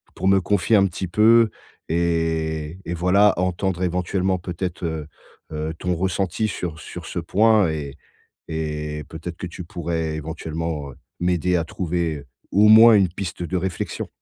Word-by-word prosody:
pour 95 Hz, -, -1 dB
me 95 Hz, 0 st, +5 dB
confier 100 Hz, +3 st, +2 dB
un 100 Hz, -1 st, +4 dB
petit 90 Hz, 0 st, -4 dB
peu 110 Hz, +4 st, +5 dB, 0.4 s
et 80 Hz, -1 st, -1 dB
et 85 Hz, -, -3 dB
voilà, 95 Hz, +4 st, +4 dB
entendre, 90 Hz, 0 st, -1 dB
éventuellement, 90 Hz, +1 st, 0 dB
peut-être, 90 Hz, 0 st, -5 dB
heu, 80 Hz, -2 st, -3 dB, 0.5 s
heu, 75 Hz, +1 st, -3 dB
ton 90 Hz, 0 st, -1 dB
ressenti 95 Hz, +3 st, -1 dB
sur 85 Hz, -6 st, -5 dB
sur -, -, -9 dB
ce -, -, -4 dB
point 105 Hz, +2 st, +3 dB
et 75 Hz, -2 st, -5 dB, 0.5 s
et 75 Hz, -1 st, -4 dB
peut-être 80 Hz, +1 st, -7 dB
que 90 Hz, -, -6 dB
tu 85 Hz, -, -8 dB
pourrais, 80 Hz, -2 st, -3 dB
éventuellement, 80 Hz, -1 st, -4 dB
heu, -, -, -18 dB, 0.2 s
m'aider 90 Hz, 0 st, +1 dB
à 85 Hz, -, +1 dB
trouver 85 Hz, -4 st, -3 dB, 0.3 s
au 105 Hz, +2 st, +5 dB
moins 110 Hz, +1 st, +9 dB
une 100 Hz, -3 st, +4 dB
piste 90 Hz, 0 st, -6 dB
de 90 Hz, +2 st, -2 dB
réflexion. 90 Hz, -1 st, -3 dB
85 Hz, 155 wpm, -22 LUFS, 80-95 Hz, 0.5 s, moins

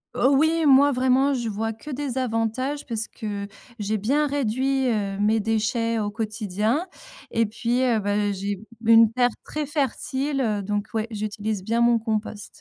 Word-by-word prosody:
Heu, 255 Hz, -, +3 dB
oui, 315 Hz, +3 st, +3 dB
moi, 280 Hz, +1 st, +6 dB
vraiment, 260 Hz, +2 st, +3 dB
je 240 Hz, -3 st, -2 dB
vois 220 Hz, +1 st, -2 dB
que 225 Hz, +7 st, -11 dB
des 270 Hz, -2 st, -3 dB
avantages 255 Hz, +4 st, -1 dB
parce 225 Hz, -3 st, -1 dB
que 205 Hz, -2 st, -5 dB, 0.3 s
j'ai 210 Hz, +1 st, -1 dB
bien 285 Hz, +9 st, +1 dB
réduit, 265 Hz, 0 st, 0 dB
heu, 200 Hz, -3 st, -1 dB
mes 215 Hz, +2 st, +3 dB
déchets 225 Hz, +1 st, 0 dB
au 205 Hz, -1 st, -2 dB
quotidien, 215 Hz, -, -1 dB, 0.5 s
et 230 Hz, -1 st, +2 dB
puis, 235 Hz, +4 st, -1 dB
heu, 235 Hz, -4 st, +2 dB
ben 205 Hz, 0 st, 0 dB
j'ai 200 Hz, +1 st, -3 dB, 0.3 s
une -, -, 0 dB
une 225 Hz, 0 st, +1 dB
terre 245 Hz, 0 st, +3 dB, 0.2 s
très 305 Hz, -1 st, -3 dB
fertile, 275 Hz, 0 st, -1 dB
heu, 210 Hz, -4 st, 0 dB
donc 205 Hz, +1 st, -2 dB
ouais, 220 Hz, 0 st, -1 dB
j'utilise 210 Hz, -1 st, -3 dB
bien 230 Hz, +3 st, 0 dB
mon 235 Hz, 0 st, +4 dB
compost. 215 Hz, -2 st, -3 dB
225 Hz, 170 wpm, -24 LUFS, 215-265 Hz, 0.5 s, moi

